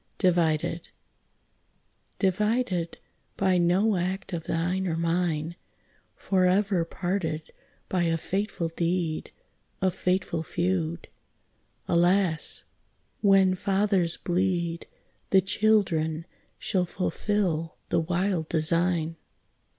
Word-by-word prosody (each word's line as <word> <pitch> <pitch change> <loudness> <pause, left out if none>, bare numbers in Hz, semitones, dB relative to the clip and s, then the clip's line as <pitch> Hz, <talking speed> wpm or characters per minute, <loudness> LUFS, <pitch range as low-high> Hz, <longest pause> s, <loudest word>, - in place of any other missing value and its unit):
DIVIDED 165 -3 +1 1.3
Divided 195 -2 0 0.4
by 190 -2 +2
no 185 +4 +3
act 185 +2 -3
of 165 -1 -4
thine 180 +3 -1
or 165 -2 -1
mine, 165 -1 -1 0.6
Forever 190 0 +2
parted 165 -3 -3 0.4
by 180 -2 0
a 165 0 +1
fatal 190 -1 -2
deed, 165 -1 -2 0.5
A 185 -1 +2
fatal 180 -2 -1
feud. 170 0 -2 0.8
Alas! 175 -1 +3 0.6
when 195 -2 +5
fathers 195 -2 +1
bleed, 175 -2 -1 0.4
The 195 - +6
children 180 -6 +1 0.3
shall 185 -2 0
fulfil 180 -3 -1
the 170 - +2
wild 175 0 -1
design. 165 0 +1
180 Hz, 90 wpm, -27 LUFS, 165-190 Hz, 1.3 s, The